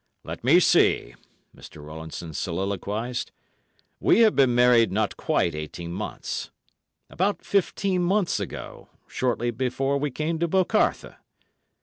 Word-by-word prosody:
"Let - - -8
me - - +6
see," - - +3 0.4
Mr. 75 - -13
Rowlandson 80 +1 -8
soliloquised. 100 +8 -3 0.7
"We - - +4
have 220 -2 +5
been 130 -3 +4
married 120 -2 +5
not 105 +1 0
quite 85 - 0
eighteen 75 +3 -6
months. 100 +4 -5 0.6
About 200 +3 -1
fifteen 195 -1 0
months 185 - +1
ago—shortly 120 +5 -4
before 130 +3 -1
we 145 +1 -1
came 155 +4 -3
to 170 - +1
'Bocarthe. 190 +5 +1
125 Hz, 115 wpm, -25 LUFS, -, 0.7 s, me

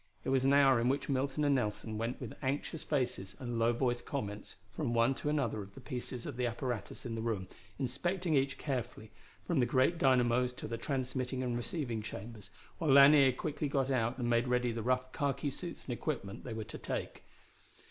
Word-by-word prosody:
It - - -2
was 135 -1 +3
an 135 - +4
hour 135 -3 +6
in 120 - +2
which 140 +2 -1
Milton 140 +2 0
and 145 -1 +4
Nelson 110 -3 -1
went 115 +3 -2
with 125 -5 -6
anxious 145 +4 -2
faces 120 -10 -1
and 120 -3 -3
low 115 +1 +4
voiced 120 0 0
comments 105 -7 -5 0.2
from 120 - -2
one 115 +3 +4
to 145 - -3
another 130 -8 0
of 100 0 -11
the - - -9
pieces 125 -2 -5
of 125 -4 -4
apparatus 120 -3 -3
in 120 - -3
the 115 - -3
room, 110 -5 -2 0.3
inspecting 165 +7 -1
each 135 -1 +2
carefully, 120 -5 -4 0.3
from 170 -5 +1
the 120 - +3
great 130 +7 +3
dynamos 125 -1 +3
to - - -7
the 115 - -3
transmitting 130 -1 -2
and 120 -1 -1
receiving 120 -2 -2
chambers, 105 -1 -8 0.3
while 160 - 0
Lanier 140 0 +8
quickly 150 +3 -3
got 135 -1 0
out 120 -1 +1
and 120 -2 -1
made 120 +1 +2
ready 125 -1 +2
the 115 0 -3
rough 130 +2 0
khaki 140 0 -1
suits 175 +4 -6
and 125 - -2
equipment 115 -6 -4
they 120 - -4
were 110 - -3
to 110 - -8
take. - - -4
125 Hz, 200 wpm, -33 LUFS, 115-140 Hz, 0.3 s, Lanier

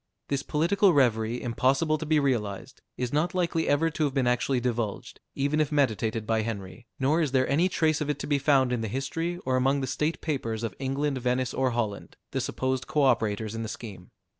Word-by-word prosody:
This 140 -1 0
political 180 +7 +2
reverie, 120 -4 +2
impossible 135 +6 +1
to 160 - -5
be 155 -1 +3
realized, 115 -8 -2 0.2
is 125 0 -3
not 160 +5 +1
likely 170 -2 0
ever 160 +3 +2
to 155 - -1
have 140 -1 -2
been 135 -2 +2
actually 125 +1 +1
divulged, 120 -4 -3 0.2
even 145 +3 +1
if 150 - 0
meditated 115 -6 +1
by 110 0 +1
Henry, 110 +1 -6
nor 145 +5 +2
is 145 -5 -1
there 130 -1 +3
any 160 +7 +2
trace 155 -3 +1
of 150 - -2
it 145 - 0
to - - -5
be 145 -1 +1
found 135 -3 +3
in 120 - -1
the 110 - -2
history, 165 - -3
or 130 -1 +1
among 135 +2 +2
the - - -1
state 150 +5 -1
papers 115 -7 -3
of 115 -4 -2
England, 135 +1 -1
Venice, 125 0 0
or 130 -1 +1
Holland, 115 -4 -3
the - - -1
supposed 130 0 -2
co 150 - +1
operators 110 -4 +1
in 115 - -4
the 110 - -4
scheme. 100 -6 -8
130 Hz, 215 wpm, -27 LUFS, 115-150 Hz, 0.2 s, be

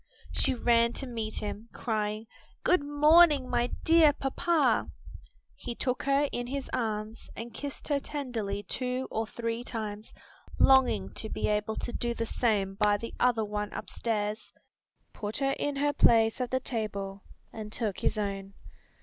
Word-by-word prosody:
She 260 - +1
ran 235 0 +3
to 275 - -2
meet 225 -3 -4
him, 210 +2 -5
crying, 215 -1 -2 0.4
"Good 360 -5 +3
morning, 295 -1 +5
my 240 -1 +1 0.2
dear 320 -2 +6
papa!" 300 +4 +1 0.6
He 235 - -6
took 250 +1 -1
her 280 +1 +2
in 245 0 -3
his 275 +1 -4
arms 220 -1 -3
and 230 +1 -7
kissed 285 -2 -6
her 285 -1 +2
tenderly 230 -9 -4
two 255 +5 -2
or 220 0 -1
three 230 +1 -3
times, 215 -3 -5 0.5
longing 255 - +4
to 220 - -5
be - - -1
able 210 +1 0
to 240 - -4
do 235 0 -1
the 230 - -2
same 210 -5 0
by 205 +1 +3
the 230 +2 -7
other 235 -3 +3
one 210 0 -3
upstairs, 215 -2 -3 0.6
put 210 +1 -4
her 275 0 +1
in 290 -1 -1
her 290 +1 +1
place 225 -1 +4
at 250 - -1
the 260 - +1
table 200 -6 -4 0.3
and 215 -1 -7
took 215 -4 -2
his - - 0
own. 195 -1 -3
230 Hz, 160 wpm, -29 LUFS, 210-265 Hz, 0.6 s, dear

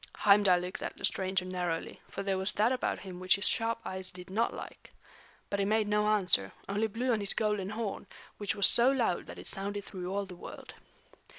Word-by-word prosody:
Heimdal 200 -3 +5
looked 180 +1 -6
at - - -5
the - - -1
stranger 190 -1 0
narrowly, 180 -3 -3
for - - -5
there 195 -1 0
was 190 +1 +2
that 220 +4 +2
about 255 - -1
him 185 -2 -8
which 185 0 +3
his 200 - +1
sharp 230 0 +1
eyes 185 0 -2
did 180 0 -10
not 225 +4 +1
like. - - -10 0.6
But 200 - -2
he 200 - +2
made 215 +1 +2
no 210 0 +2
answer, 185 - +2
only 210 +3 0
blew 240 +4 -1
on 220 - +1
his 200 -1 +2
golden 210 -3 0
horn, 215 -1 -4 0.3
which 205 -3 -1
was 200 -2 +4
so 240 +2 +7
loud 240 -9 0
that - - -9
it - - -9
sounded 200 +1 -1
through 185 -2 -6
all 200 +1 -1
the 185 -2 -10
world. - - -10
200 Hz, 215 wpm, -31 LUFS, 185-215 Hz, 0.6 s, so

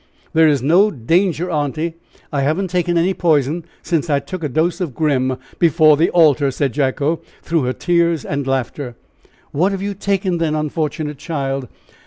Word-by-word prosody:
"There 160 0 +5
is 140 -4 +2
no 180 +9 +5
danger, 175 - 0
aunty. 155 +2 -1 0.4
I 140 - +1
haven't 165 +7 0
taken 175 -1 +1
any 175 +3 +2
poison 160 -2 +1 0.2
since 165 -1 -1
I 145 - +3
took 160 +5 -6
a 150 - -1
dose 160 +7 0
of 155 -9 -3
Grim 130 -5 +1 0.2
before 155 -2 +5
the 160 +4 +2
altar!" 150 -4 +4
said 135 -1 -1
Jacko, 145 +3 0 0.2
through 165 -5 0
her 125 - 0
tears 170 -2 +1
and 140 -1 -3
laughter. 130 -1 -2 0.6
"What 180 +7 +1
have 195 -1 -3
you 200 0 -2
taken, 195 -2 -1
then, 160 -2 0
unfortunate 150 -1 -3
child?" 135 -4 -3
155 Hz, 170 wpm, -19 LUFS, 140-170 Hz, 0.6 s, There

